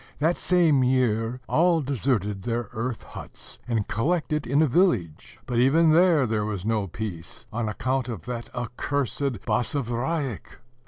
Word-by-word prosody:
That 160 +4 +1
same 165 -7 +4
year, 125 -1 +1
all 170 0 +3
deserted 120 -7 -1
their 115 +1 -2
earth 115 +1 -3
huts, - - -8
and 115 -4 0
collected 150 +4 0
in 140 +5 +3
a - - +3
village; 125 - +1
but, 120 -2 -1
even 155 +6 +5
there, 165 -4 +5
there 110 -2 0
was 100 -3 -4
no 110 -3 0
peace, 90 -3 -6
on 115 -1 -1
account 130 +3 -1
of 105 -9 -5
that 120 -1 -5
accursed 130 0 -2
Basavriuk. 125 - -2
125 Hz, 145 wpm, -25 LUFS, 110-145 Hz, -, even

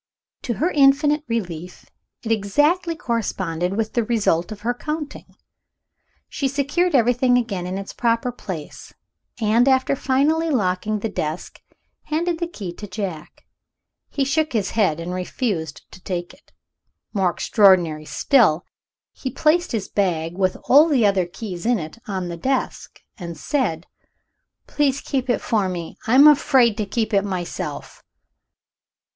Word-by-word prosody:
To 235 - -3
her 340 - 0
infinite 290 +1 +4
relief, 180 -7 -5 0.4
it 225 - -3
exactly 295 - +1
corresponded 190 - -2
with 225 -1 -2
the 235 - +1
result 215 -6 0
of 210 -1 -8
her 240 +3 0
counting. 300 +3 -6 0.9
She 275 - -2
secured 285 +6 0
everything 245 +1 +3
again 200 -7 -2
in 185 +1 -3
its 195 0 -7
proper 235 +1 0
place; 180 -10 -8 0.4
and, 225 +3 +3
after 265 +1 +3
finally 295 +6 +1
locking 210 -4 0
the 225 - -1
desk, 160 -5 -5 0.4
handed 330 +2 -1
the 340 - -1
key 200 - -7
to 210 - -7
Jack. 185 -6 -6 0.6
He 280 - -1
shook 310 +2 0
his 210 -4 0
head, 190 -8 +1
and 170 +2 -5
refused 180 - -3
to 185 - -14
take 175 -1 -4
it. - - -23 0.6
More 190 -4 +2
extraordinary 175 -5 +3
still, 190 - +3 0.5
he 260 - -5
placed 315 +7 +1
his 215 -4 -2
bag, 170 -4 -1
with 185 -1 0
all 295 +5 +6
the 265 -8 +3
other 195 -3 +2
keys 180 -1 -7
in 240 +1 +2
it, 160 +5 -7
on 190 -3 -3
the 170 -1 -5
desk, 265 +9 -3 0.2
and 170 -3 -7
said, 185 - -1 0.8
"Please 280 -2 0
keep 265 -2 -3
it 245 - +1
for 205 -4 0
me; 175 -2 -6
I'm 260 +6 +7
afraid 265 -6 +5
to 215 - -2
keep 220 +1 -2
it 200 -1 +3
myself." 185 -4 -5
220 Hz, 145 wpm, -22 LUFS, 185-270 Hz, 0.9 s, I'm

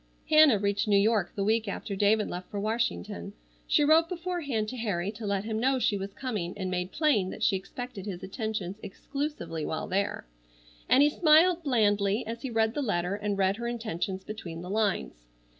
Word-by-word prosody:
Hannah 310 -7 +7
reached 200 +1 0
New 205 -1 +4
York 205 -2 +2
the 200 - -1
week 220 +2 +1
after 200 0 -4
David 210 +2 +3
left 180 +1 -6
for 205 - -4
Washington. 200 - -2 0.3
She - - +4
wrote 320 +3 +5
beforehand 340 - -2
to 255 - -6
Harry 200 -5 -1
to 215 0 -7
let 200 -1 0
him 220 0 -2
know 265 +3 +2
she 230 -4 +1
was 195 0 -4
coming, 210 -10 -3
and 185 -2 -3
made 180 0 -2
plain 265 - +2
that - - -6
she - - +3
expected 210 +2 -6
his 180 -3 -6
attentions 205 -2 -4
exclusively 195 - -5
while 160 - -3
there, 200 - -1 0.6
and 270 - +6
he 295 - +5
smiled 330 +3 +5
blandly 210 -6 +2
as 230 +1 -6
he 265 - -4
read 225 -1 +1
the 295 - -2
letter 180 -7 -1
and 205 0 -2
read 195 +1 +2
her 235 +1 -4
intentions 200 -5 -3
between 175 -6 -7
the 180 - -6
lines. 200 - -1
210 Hz, 190 wpm, -28 LUFS, 195-245 Hz, 0.6 s, Hannah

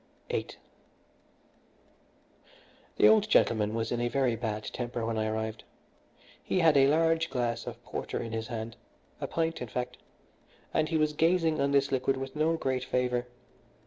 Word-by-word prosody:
VIII - - -2 2.5
The - - +6
old 215 -1 +5
gentleman 110 - +3
was 115 0 -2
in 120 -1 -1
a 120 - +1
very 125 -1 +1
bad 110 -2 -3
temper 120 0 -4
when 115 -1 -1
I 110 - 0
arrived. 110 0 -3 0.8
He - - -2
had 165 -4 +5
a 135 -1 +6
large 165 +2 +2
glass 120 -2 -2
of - - -7
porter - - -4
in 115 - -5
his 110 0 -3
hand 115 -1 -5 0.4
a - - -3
pint, 165 -2 -1
in 125 - -4
fact 125 +3 -4 0.8
and 155 0 +1
he 165 - +1
was 155 -1 +1
gazing 165 -1 +2
on 140 - +2
this 140 0 +2
liquid 135 0 +1
with 135 +1 -6
no 160 +2 +2
great 130 -4 -1
favour. 125 -1 0
130 Hz, 165 wpm, -29 LUFS, 115-155 Hz, 2.5 s, The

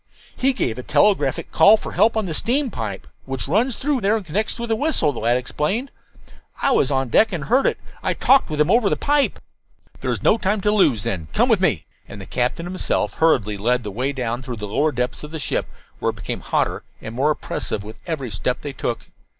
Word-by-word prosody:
"He 270 +1 +2
gave 125 - -2
a - - -3
telegraphic 145 -2 +2
call 215 +2 +7
for - - -7
help 225 0 +3
on 215 - 0
the 170 - -3
steam 250 - +1
pipe 100 - -5 0.2
which 135 -1 -4
runs 225 - +1
through 280 -2 0
there 210 +3 +2
and 210 - -7
connects 205 +7 -1
with 235 -1 -5
the 225 - +2
whistle," 240 - +1
the - - -6
lad 120 +2 +2
explained. 155 - -2 0.7
"I 275 - +2
was 140 - +3
on 135 -2 0
deck 220 - +4
and 170 -5 -3
heard 255 - +3
it. - - 0 0.2
I - - -1
talked 270 +1 +4
with 150 -1 -3
him 150 +4 +3
over 225 -2 +4
the - - 0
pipe." 290 -1 +1 0.6
"There - - -3
is - - -3
no 225 - +4
time 205 +1 0
to 210 - +2
lose, 160 - +3
then. 85 -5 -3
Come - - +3
with - - +4
me." - - +1 0.2
And 100 - -10
the 95 - -8
captain 125 - -2
himself 185 +1 -1
hurriedly 110 -11 +2
led 120 +4 +1
the 105 - -5
way 130 +7 -1
down 125 -2 -3
through 130 -2 -5
the 105 -2 -6
lower 145 +9 +1
depths 125 +1 -3
of 150 - -7
the 160 - -5
ship, 150 - -2 0.3
where - - 0
it - - -4
became - - -5
hotter - - -1 0.2
and 110 - -8
more 135 +5 +1
oppressive 110 -8 -3
with 110 +1 -10
every 140 -8 -3
step 110 +5 -2
they 145 - -5
took. 120 -2 -3
150 Hz, 230 wpm, -21 LUFS, -, 0.7 s, call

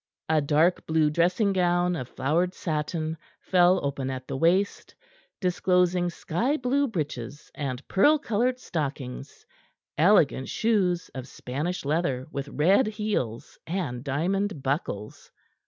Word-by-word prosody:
A 160 -1 +3
dark 155 +5 +2
blue 160 -1 +2
dressing 180 +6 +2
gown 175 -1 +2
of 130 -6 -5
flowered 170 +7 0
satin 155 0 -2 0.2
fell 180 0 +4
open 135 -1 -2
at 130 -1 -5
the 135 - -4
waist; 175 +8 +1 0.4
disclosing 180 -1 +2
sky 230 - -1
blue 275 +3 +1
breeches 145 - -5
and 135 -2 -5
pearl 295 +11 +4
colored 250 -1 0
stockings, 140 - -5 0.5
elegant 160 -7 +4
shoes 190 -6 +1
of 130 -1 -7
Spanish 145 +8 -4
leather 140 -4 0
with 140 0 -4
red 185 - +3
heels 210 - -3
and 160 -9 -3
diamond 170 +4 -1
buckles. 130 -7 -3
170 Hz, 120 wpm, -26 LUFS, 140-190 Hz, 0.5 s, fell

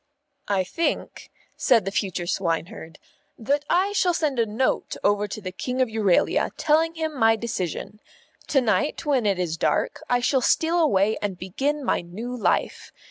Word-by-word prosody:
"I 195 -2 +1
think," 330 - -3 0.3
said 230 -8 +3
the 195 - -2
future 185 -3 -2
swineherd, 170 -1 -3 0.4
"that 280 +5 0
I 375 +3 +2
shall 365 -4 +2
send 290 -7 0
a 230 - +2
Note 225 +5 -1
over 205 0 +2
to 205 - -6
the 185 -3 -6
King 250 +7 -4
of 255 -2 +2
Euralia, 210 -5 +2
telling 320 +2 +2
him 315 -2 -3
my 225 -3 +4
decision. 210 -2 -4 0.5
To 270 - +3
night, 270 +7 0
when 265 -7 +2
it 195 -2 +1
is 170 -3 -2
dark, - - 0
I 245 - +3
shall 255 +2 +1
steal 330 +7 +2
away 215 - +2
and 200 -3 -3
begin 270 +11 -2
my - - +1
new 215 +9 -6
life. 240 - -1
225 Hz, 170 wpm, -24 LUFS, 195-290 Hz, 0.5 s, my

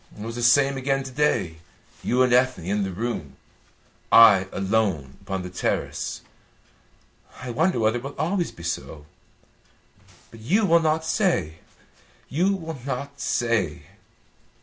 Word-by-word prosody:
It 105 - -8
was 115 0 -6
the 120 - -4
same 135 +3 +4
again 135 +1 0
to 135 - -8
day. 120 - 0 0.5
You 125 +1 +2
and 125 -1 +2
Ethne 125 -7 +2
in 100 +3 0
the 95 - -1
room, 100 - -4 0.8
I 105 -5 +7
alone 95 -9 -1
upon 95 -1 -4
the 90 - -6
terrace. 90 - -3 1.2
I 125 -1 -6
wonder 160 +4 +1
whether 110 +2 +1
it - - -14
will 140 +1 -7
always 175 +1 -1
be 85 - -13
so. 80 -3 -5 1.3
But 115 - -13
you 190 - +1
will 170 -2 +5
not 160 0 0
say 155 - 0 0.7
you 180 +8 +1
will 160 -6 -7
not 140 +1 -5
say." 110 -10 -1
120 Hz, 145 wpm, -24 LUFS, 95-145 Hz, 1.3 s, I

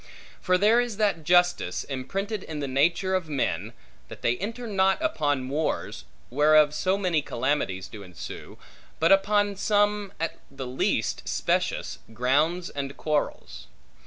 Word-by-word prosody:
For 180 -1 +3
there 215 +5 +4
is 240 -4 -4
that 200 -7 +1
justice, 175 - +2
imprinted 195 - -4
in 155 -4 -6
the 140 - -3
nature 170 +8 +1
of 185 -4 -1
men, 140 -3 -1 0.4
that - - -12
they 120 - +2
enter 230 +6 -5
not 195 -3 +2
upon 145 - 0
wars 150 +4 -2 0.3
(whereof 150 +2 +5
so 185 +6 +1
many 180 -6 +1
calamities 120 -9 -2
do 105 - -10
ensue) 90 -3 -9 0.4
but 165 +3 +3
upon 205 +1 +3
some, 205 0 +1
at 165 - -3
the 135 -1 -7
least 125 +1 -1
specious, - - -1 0.2
grounds 150 +9 +1
and 140 -1 -5
quarrels. 145 - -3
165 Hz, 140 wpm, -26 LUFS, 140-195 Hz, 0.4 s, whereof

